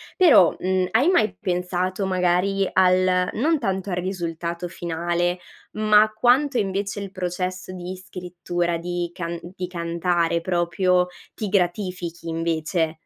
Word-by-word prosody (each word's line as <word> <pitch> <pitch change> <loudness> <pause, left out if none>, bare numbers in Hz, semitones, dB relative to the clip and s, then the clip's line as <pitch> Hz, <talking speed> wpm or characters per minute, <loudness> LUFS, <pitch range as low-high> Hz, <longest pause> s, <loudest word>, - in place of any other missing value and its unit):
Però, 255 - +6
mhmm, 185 0 0
hai 260 - +4
mai 215 - +2
pensato 180 +1 -1
magari 185 +1 +1
al 185 0 +3
non 305 +6 +1
tanto 190 -3 -2
al 175 - -1
risultato 175 -1 -3
finale, 175 +1 -2 0.3
ma 215 0 +4
quanto 250 +5 +3
invece 200 0 -2
il 195 -1 -6
processo 185 0 -4
di 180 0 -6
scrittura, 175 -2 -3
di 175 0 -3
can 170 -1 -4
di 180 +1 -6
cantare 170 -1 0
proprio 180 +1 +1 0.3
ti 210 -3 -3
gratifichi, 180 -3 -1
invece? 165 0 -1
180 Hz, 125 wpm, -23 LUFS, 175-195 Hz, 0.3 s, Però